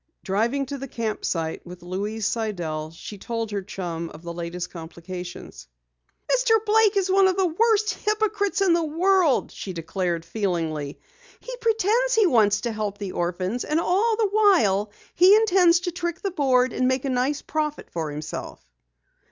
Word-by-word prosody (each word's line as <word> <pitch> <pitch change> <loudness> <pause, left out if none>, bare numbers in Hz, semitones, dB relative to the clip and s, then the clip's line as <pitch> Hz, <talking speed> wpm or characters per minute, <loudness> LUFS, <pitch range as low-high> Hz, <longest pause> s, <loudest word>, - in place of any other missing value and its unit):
Driving 235 +8 0
to 280 +1 -6
the 275 - -6
camp 225 -3 -4
site 160 -2 -2
with 175 0 -11
Louise 205 +4 -3
Sidell, 175 -9 -2
she 180 +5 -10
told 230 0 -4
her 200 -1 -2
chum 170 -4 -5
of 160 - -13
the 170 0 -6
latest 175 +1 -5
complications. 170 - -9 0.6
"Mr. - - +3
Blake 430 -1 +4
is 380 -1 +1
one 385 0 +5
of 375 0 0
the 380 - +3
worst 430 +5 +2
hypocrites 420 -1 -1
in 375 -3 +4
the 335 0 +2
world," 335 -1 +2
she 190 - -7
declared 170 0 -3
feelingly. 165 -7 -3 0.4
"He - - -7
pretends 460 +2 +1
he 440 -2 +5
wants 215 - +3
to 235 - -2
help 210 -2 -3
the 200 -2 -5
orphans, 185 +7 -2
and 305 +2 0
all 410 +7 +2
the 430 -2 +1
while 320 - +3 0.2
he 370 +4 +7
intends 365 -5 +4
to 360 -1 -2
trick 345 +1 -4
the 395 - -2
Board 260 -6 +2
and 255 - +1
make 260 +1 0
a - - -1
nice 260 +3 0
profit 305 -1 -3
for 160 -3 -3
himself." 150 +1 -6
250 Hz, 170 wpm, -24 LUFS, -, 0.6 s, he